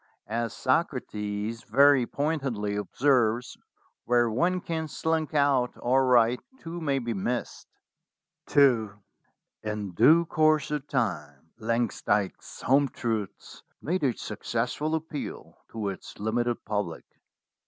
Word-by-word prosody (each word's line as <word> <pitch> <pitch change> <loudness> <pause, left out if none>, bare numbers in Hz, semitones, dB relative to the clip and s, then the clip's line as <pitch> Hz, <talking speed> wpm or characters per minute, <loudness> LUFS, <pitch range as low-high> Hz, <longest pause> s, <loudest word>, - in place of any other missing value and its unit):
As 115 +1 -3
Socrates 115 -6 -1
very 140 -3 +5
pointedly 135 -9 -2
observes, 120 +3 +1 0.5
where 120 -1 +3
one 175 +11 +1
can 160 -2 -3
slink 160 0 -1
out 140 -4 +2
all 125 +2 +2
right 125 -2 +4 0.2
two 170 -2 -7
may 140 -3 +1
be 120 -3 -2
missed." 120 +5 -3 0.9
II 125 -7 +5 0.7
IN 105 -2 -4
due 165 - +5
course 155 -2 +2
of 150 -1 -3
time 75 - -3
"Langsdyke's 110 -3 -1
Home 140 +2 +3
Truths" 110 -6 -4 0.2
made 180 +2 -2
a 130 -5 +1
successful 120 +8 -2
appeal 160 -2 -6
to 110 -3 -3
its 95 - -8
limited 120 +3 -1
public. 100 -6 -3
120 Hz, 110 wpm, -27 LUFS, 110-145 Hz, 0.9 s, very